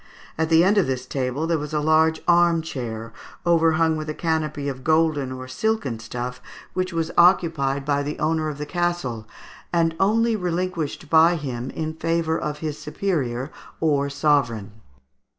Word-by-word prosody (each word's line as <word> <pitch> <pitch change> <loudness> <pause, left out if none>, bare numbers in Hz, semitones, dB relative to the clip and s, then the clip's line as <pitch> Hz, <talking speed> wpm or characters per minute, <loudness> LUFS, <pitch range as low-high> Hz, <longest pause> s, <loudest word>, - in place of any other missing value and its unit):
At 160 0 -1
the 165 0 +6
end 200 +3 +4
of 190 - +1
this 130 -1 -2
table, 130 +3 -2
there 165 -1 +1
was 150 +1 -5
a - - +2
large 160 +1 +3
arm 170 -1 +4
chair, 115 -7 -6 0.3
overhung 165 -1 +3
with 155 0 -5
a 150 - -3
canopy 155 -3 -1
of 130 -2 -5
golden 155 -4 +2
or 130 0 -7
silken 210 - -1
stuff, 125 +3 -5 0.3
which 185 0 -1
was 165 -1 -2
occupied 160 -6 +3
by 145 -1 +1
the 145 +1 -4
owner 155 0 0
of 145 - -6
the 150 - -4
castle, 175 -11 -2 0.4
and 165 -1 +1
only 225 +3 +3
relinquished 180 -5 -2
by 165 +3 +5
him 130 -5 -4
in 160 0 -4
favour 165 0 0
of 150 -2 -3
his 155 -1 -3
superior 150 -5 -2 0.3
or 145 -3 +1
sovereign. 140 -8 +1
155 Hz, 165 wpm, -23 LUFS, 135-165 Hz, 0.4 s, the